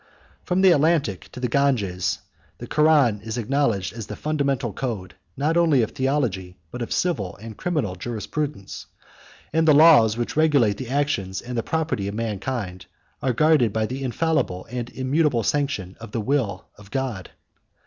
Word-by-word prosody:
From 180 +1 +1
the 190 -1 +7
Atlantic 150 - +1
to - - -9
the 125 - 0
Ganges, 115 -9 +1 0.4
the - - -7
Koran 150 -9 +3
is 110 +2 -5
acknowledged 115 -6 0
as 115 -3 -7
the - - -6
fundamental 140 -7 -1
code, 105 -8 -4 0.2
not 155 +5 +1
only 160 -8 +4
of 110 - -3
theology, 120 -10 -1
but 125 - -6
of 120 - -4
civil 110 - -1
and 110 +2 -9
criminal 150 - -1
jurisprudence; 120 +4 -5 0.7
and 160 0 +2
the 150 - +7
laws 145 -9 +7
which 120 - -3
regulate 140 -10 +3
the 125 0 -6
actions 135 -10 -1
and 125 0 -7
the 115 - +1
property 150 -9 -2
of 100 - -4
mankind 105 -4 -4 0.3
are 130 - +1
guarded 140 -2 +3
by 110 -1 +1
the 130 +4 -5
infallible 135 - -1
and 120 -1 -4
immutable 130 -1 +1
sanction 135 -11 -1
of 115 -2 -10
the 115 - -1
will 110 -6 -1
of 100 -2 -15
God. 125 -7 -3
125 Hz, 165 wpm, -23 LUFS, 105-145 Hz, 0.7 s, the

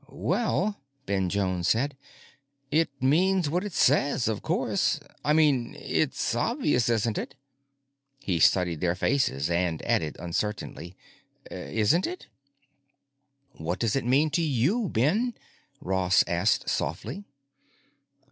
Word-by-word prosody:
"Well," 210 -5 -1 0.2
Ben 95 -2 0
Jones 95 -3 -1
said, 135 +5 +1 0.8
"it 160 +3 +2
means 170 +4 +2
what 180 +3 0
it 205 - -5
says, 140 -3 +2
of 110 -2 -1
course. - - 0 0.2
I 150 - +2
mean, 145 -6 +2
it's - - -1
obvious, 120 -2 +1
isn't 115 -1 0
it?" - - -7 0.8
He 95 - -2
studied 90 -2 +3
their 90 -1 +1
faces 90 - 0
and 85 -2 0
added 75 -2 0
uncertainly, 95 0 -4 0.5
"Isn't 115 - 0
it?" 365 +1 -7 1.3
"What 80 +3 -4
does 115 0 0
it 135 - 0
mean 140 +6 +2
to 170 - +1
you, 165 - +1
Ben?" 205 - +1 0.4
Ross 95 0 +2
asked 90 +4 +1
softly. 100 - -3
120 Hz, 120 wpm, -27 LUFS, 90-155 Hz, 1.3 s, studied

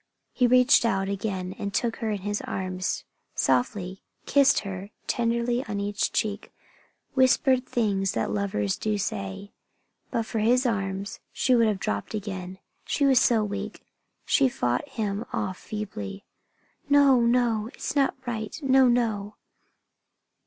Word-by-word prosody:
He 250 - +3
reached 250 0 +5
out 195 -4 +1
again 190 -2 -3
and 200 -2 -3
took 230 +3 -1
her 225 - -2
in 205 -2 -2
his 205 +1 -2
arms, 185 -1 -3 0.3
softly, 180 +9 0 0.2
kissed 280 -1 +4
her 195 0 -6 0.2
tenderly 235 +1 0
on 205 -2 -3
each 205 0 -1
cheek, 210 -1 -2 0.6
whispered 260 0 +3
things 200 -5 0
that 110 -3 -1
lovers 100 -1 -1
do 215 -1 -1
say. 105 - -4 0.6
But 230 -1 -1
for 220 - -3
his 245 +4 +3
arms 195 -3 -2
she 255 - +1
would 230 -2 +5
have 210 -2 +1
dropped 100 - -3
again, 190 -3 -5 0.3
she 285 - 0
was 265 -3 +5
so 225 -3 +3
weak. 205 0 -5 0.4
She 270 -2 +3
fought 125 - -1
him 215 -4 -2
off 185 -1 -3
feebly. 105 - -6 0.6
"No! 280 -3 +6
No! 235 -2 +2
It 240 - -13
is - - -4
not 275 -2 +2
right! 220 +1 -4
No! 265 -1 +5
No!" 220 -4 0
210 Hz, 145 wpm, -26 LUFS, 195-240 Hz, 0.6 s, No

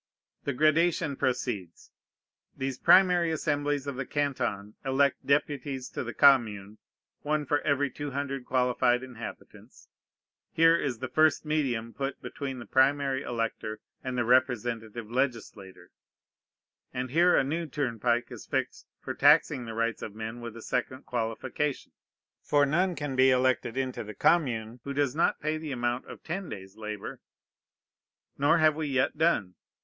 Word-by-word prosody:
The 140 - -1
gradation 155 +1 +2
proceeds. 110 -10 -3 0.7
These 135 -1 -3
primary 180 -3 +5
assemblies 145 -3 -1
of 140 -2 -5
the 135 - -3
Canton 125 -8 -2
elect 135 +1 +1
deputies 140 -2 -1
to - - -4
the 120 - -5
Commune, 110 -7 +3 0.4
one 150 0 -1
for 145 +2 +1
every 145 -2 +1
two 145 +2 -5
hundred 135 -1 -3
qualified 125 -1 +1
inhabitants. 125 -3 -11 0.6
Here 165 +1 +5
is 135 -7 -1
the 130 +3 -4
first 155 +3 +3
medium 125 -7 -1
put 135 0 -4
between 135 -2 -6
the 120 - -8
primary 135 0 +2
elector 115 -3 -3 0.2
and 130 -1 -3
the 120 - +1
representative 120 -3 0
legislator; 115 -8 -3 1.0
and 125 0 -4
here 175 +4 +5
a - - +4
new 160 +5 -2
turnpike 120 -4 -1
is - - -9
fixed - - -3
for - - -5
taxing 145 -3 +4
the 115 -1 -7
rights 115 -1 -1
of 105 - -7
men 110 +2 -6
with 115 -1 -7
a 115 - -10
second 130 +2 -3
qualification: 125 +5 -3 0.5
for 145 -1 +3
none 175 +5 +1
can 145 -3 -4
be 130 +1 +5
elected 130 -1 +1
into 130 -1 -2
the 105 0 -9
Commune 120 - +1
who 140 - -4
does 145 -2 +1
not 165 - +2
pay 155 +1 -2
the 155 -2 -6
amount 120 0 -2
of - - -11
ten 180 +2 -4
days' 95 -1 -9
labor. 105 -2 -6 1.2
Nor 145 +2 +4
have 155 -2 +4
we 155 -1 -2
yet 130 -2 +1
done. 150 - +1
130 Hz, 150 wpm, -28 LUFS, 120-145 Hz, 1.2 s, primary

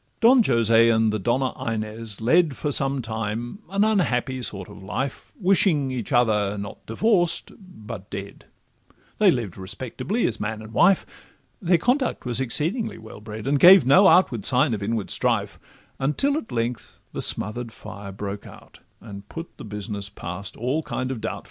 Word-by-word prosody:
Don 245 +2 +6
Jose 115 - +4
and 110 -1 +2
the 110 - -1
Donna 125 +6 0
Inez 110 -1 -4
led 155 +5 +3
For 150 - -2
some 135 -1 0
time 115 - -4
an 200 +2 +1
unhappy 135 - 0
sort 100 -5 -2
of - - -12
life, 130 +8 -5
Wishing 180 -8 +3
each 125 -4 -4
other, 105 -4 +2
not 100 0 -7
divorced, 175 - +1
but 115 - -10
dead; 100 0 -8 0.7
They 210 -2 +6
lived 115 - -1
respectably 130 - -3
as 115 - -1
man 110 +1 -4
and 110 +1 -12
wife, 190 - +4 0.6
Their 175 -2 +3
conduct 250 - 0
was 125 0 0
exceedingly 160 - -1
well 110 -1 -12
bred, 110 +1 -8
And 140 +1 +1
gave 185 -2 +8
no 185 +9 +6
outward 125 - +4
signs 130 +3 +3
of 105 - -3
inward 110 0 -2
strife, - - 0 0.4
Until 150 - +1
at 300 -7 -5
length 120 0 -3
the - - -4
smother'd 115 +3 0
fire 100 -1 -9
broke 100 +1 -6
out, - - -15 0.2
And 100 -2 -10
put 165 +1 -8
the - - -9
business 105 -1 -5
past 95 0 -7
all 130 +7 -1
kind 130 -4 -4
of 120 -4 -5
doubt. 110 - -3
120 Hz, 165 wpm, -24 LUFS, 105-160 Hz, 0.7 s, gave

